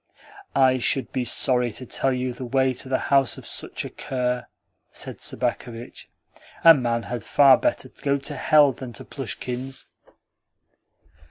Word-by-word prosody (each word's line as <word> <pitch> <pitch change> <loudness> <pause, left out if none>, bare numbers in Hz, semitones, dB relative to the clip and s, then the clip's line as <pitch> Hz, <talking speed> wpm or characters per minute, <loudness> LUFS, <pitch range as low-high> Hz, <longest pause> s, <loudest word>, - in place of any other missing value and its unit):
"I 130 -1 +4
should 130 +2 0
be 130 - -1
sorry 125 0 +1
to 130 - -7
tell 135 +2 0
you 125 -1 -2
the 125 +2 -8
way 130 +1 +1
to 130 +1 -9
the 130 - +2 0.2
house 135 -2 +3
of - - -11
such - - -5
a - - -5
cur," 125 -1 -3 0.4
said - - -8
Sobakevitch. 120 0 -3 0.5
"A 165 - +10
man 120 -5 -1
had 120 +3 -5
far 140 -2 +6
better 305 -1 -1
go 140 0 -2
to 145 +1 -6
hell 145 0 +5
than 125 -1 -9
to - - -9
Plushkin's." 130 +2 -5
130 Hz, 155 wpm, -24 LUFS, 125-135 Hz, 0.5 s, A